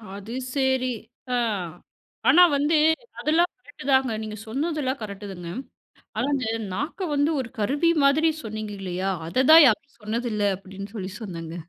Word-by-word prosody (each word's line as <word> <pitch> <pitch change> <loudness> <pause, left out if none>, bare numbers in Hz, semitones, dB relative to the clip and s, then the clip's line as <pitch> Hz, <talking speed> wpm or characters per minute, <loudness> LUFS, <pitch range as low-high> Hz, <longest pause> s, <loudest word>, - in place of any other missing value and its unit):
அது 205 +3 -9 0.2
சரி. 265 -1 +2 0.5
ஆ. - - +3 0.9
ஆனா 340 +7 +7 0.2
வந்து 295 +3 +2 0.4
அதெல்லாம் 335 +3 +2
கரெக்ட் 290 -7 -14
தாங்க. 265 -2 +3
நீங்க 215 0 -6
சொன்னதெல்லாம் 280 +1 -2
கரெக்ட் 205 -1 -7
தாங்க. 175 -2 -8 0.7
"ஆனா, - - 0
அந்த 260 -4 -1 0.3
நாக்க 295 - -4
வந்து 285 +2 +2
ஒரு 245 - -5
கருவி 285 +10 +2
மாதிரி 310 +4 +4
சொன்னீங்க 215 -1 -5
இல்லையா? 190 +1 -2 0.2
அதை 255 +10 +1
தான் 325 0 +10
யாரும் 250 +2 0
சொன்னதில்லை." 215 0 -2 0.2
அப்படீன்னு 195 +1 -9
சொல்லி 190 -2 -4
சொன்னேங்க. 165 -4 -6
245 Hz, 145 wpm, -25 LUFS, 205-285 Hz, 0.9 s, தான்